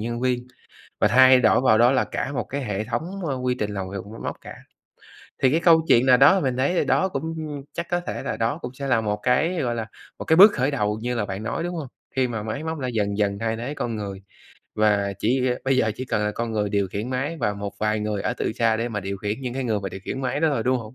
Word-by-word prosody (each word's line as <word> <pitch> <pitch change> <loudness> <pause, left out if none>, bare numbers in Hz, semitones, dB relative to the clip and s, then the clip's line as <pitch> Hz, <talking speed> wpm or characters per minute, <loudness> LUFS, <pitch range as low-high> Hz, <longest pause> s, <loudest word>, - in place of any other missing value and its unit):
nhân 120 +2 -3
viên 125 -1 -1 0.5
và - - +4
thay 130 +1 +7
đổi 125 - +4
vào 110 -4 +4
đó 120 +2 +5
là 135 - +2
cả 140 - -4
một - - -1
cái 140 +1 -5
hệ 105 -3 -2
thống, 170 - -4
ơ, 140 -4 -1
quy 125 0 -1
trình 105 0 -2
làm 95 -2 -4
việc 100 - -5
bằng 100 - -13
máy 115 - -10
móc - - -5
cả. - - -9 0.9
Thì 130 - +5
cái 160 - +2
câu 165 -2 +5
chuyện 120 +2 +5
nào 125 -1 +6
đó 145 +9 +6
mình 130 -6 -1
thấy 140 +7 +1
thì - - +1
đó 190 - +2
cũng 160 +1 -4 0.4
chắc 170 0 -4
có 175 0 +1
thể - - -4
là - - -3
đó 115 +7 0
cũng 125 +1 -6
sẽ 140 +1 -5
là 120 -4 +2
một 105 -1 -1
cái, 160 +8 +2
gọi 120 -2 -1
là, 115 -1 -4 0.3
một - - -5
cái 160 - +4
bước 200 +4 +9
khởi 135 +2 0
đầu 105 -5 -1
như 125 +1 -2
là 110 -3 -1
bạn 100 +2 -5
nói, 165 - -3
đúng 175 +1 -3
hông? 155 -5 -5 0.3
Khi 130 -1 +2
mà 110 -3 -4
máy 125 +7 -4
móc 160 -1 -4
đã 130 - -2
dần 105 -4 -1
dần 100 -1 0
thay 115 0 -1
thế 130 +5 -4
con 120 -6 -3
người. 100 -2 -6 0.5
Và 105 -2 +2
chỉ, 125 +4 +1
a - - +1
bây 135 0 +2
giờ 110 -4 +2
chỉ 130 - -4
cần 110 -4 -1
là 105 - -1
con 115 0 -3
người 105 -2 0
điều 100 -1 0
khiển 105 +7 -4
máy 140 +6 -2
và 105 - 0
một 100 0 -5
vài 110 0 0
người 105 -1 -2
ở - - -1
từ - - -2
xa 115 -1 +1
để 115 +2 -2
mà 105 -3 -3
điều 100 +1 -4
khiển 105 +5 -4
những 125 -2 -4
cái 135 0 -2
người 110 -4 0
mà 95 - -4
điều 95 +1 -8
khiển 135 - -4
máy 135 +2 -2
đó 160 - +3
thôi, 135 -6 0
đúng 130 +1 +1
hông? 115 +1 -10
120 Hz, 290 wpm, -24 LUFS, 105-135 Hz, 0.9 s, bước